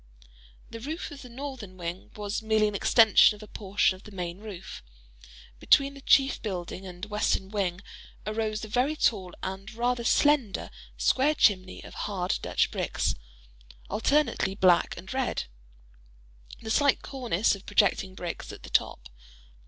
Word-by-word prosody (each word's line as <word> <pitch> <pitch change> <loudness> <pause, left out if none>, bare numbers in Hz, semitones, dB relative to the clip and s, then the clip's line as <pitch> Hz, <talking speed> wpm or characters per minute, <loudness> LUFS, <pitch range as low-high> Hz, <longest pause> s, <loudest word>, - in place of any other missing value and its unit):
The 230 - -7
roof 310 +8 -5
of 280 -1 -9
the 250 - -11
northern 245 -7 -7
wing 175 +1 -6
was 210 0 -3
merely 220 -1 +2
an 210 - -3
extension 215 +1 +6
of 210 - -12
a - - -11
portion 200 -2 +1
of 185 - -15
the 210 - -13
main 180 -1 -5
roof. 205 -4 -8 0.8
Between 275 - +4
the 275 - -12
chief 270 0 +4
building 185 -2 -5
and 180 +1 -7
western 210 -2 0
wing 190 -3 -2 0.4
arose 215 0 -2
a - - -9
very 250 +8 +1
tall 190 -10 0
and 195 +2 -5
rather 240 +1 0
slender 270 -4 +2 0.3
square 285 +4 +3
chimney 185 -7 +2
of - - -11
hard 185 -3 -2
Dutch - - +1
bricks, - - -1 0.8
alternately 230 -3 +1
black 185 -3 +3
and 190 - -8
red:—a - - -8
slight 280 +3 +3
cornice 240 -8 0
of 200 0 -8
projecting 190 -2 +2
bricks 175 -2 -6
at - - -11
the - - -10
top. - - 0
210 Hz, 150 wpm, -28 LUFS, 185-240 Hz, 0.8 s, extension